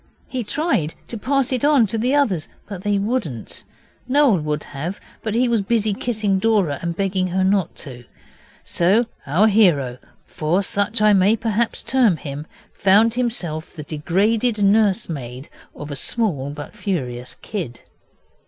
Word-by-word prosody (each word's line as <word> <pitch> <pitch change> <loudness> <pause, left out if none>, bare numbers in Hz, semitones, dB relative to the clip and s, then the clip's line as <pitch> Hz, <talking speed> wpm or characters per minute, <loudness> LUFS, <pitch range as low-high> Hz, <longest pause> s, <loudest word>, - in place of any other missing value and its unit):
He 255 -2 -3
tried 210 - -1
to - - -5
pass 260 +3 0
it 255 - -1
on 290 -5 +5
to 220 +2 -3
the 250 +5 +1
others, 205 - +1 0.2
but 195 -3 -7
they 205 0 +1
wouldn't. 200 - -3 0.4
Noel 265 - +4
would 150 -1 -2
have, 160 +8 -5 0.2
but 220 -1 -3
he 250 +2 +3
was 230 -3 +2
busy 215 0 +1
kissing 210 -3 -1
Dora 195 -9 +1
and 170 -1 -3
begging 190 0 0
her 185 +1 0
not 190 -3 +1
to. 125 -3 -10 0.6
So 195 +8 +3 0.2
our 170 +10 +4
hero, 160 - +3 0.3
for 170 +6 0
such 205 +3 0
I 210 -1 +6
may 195 +3 +4
perhaps 225 +1 -1
term 240 -10 +3
him, 145 +1 -7 0.3
found 210 +4 +4
himself 190 -11 -3
the 155 - -6
degraded 205 - +1
nursemaid 185 - +1 0.3
of 150 0 -8
a - - -3
small 150 - -1
but 145 +6 -8
furious 130 -12 -3
kid. 165 - -5
200 Hz, 155 wpm, -21 LUFS, 155-225 Hz, 0.6 s, I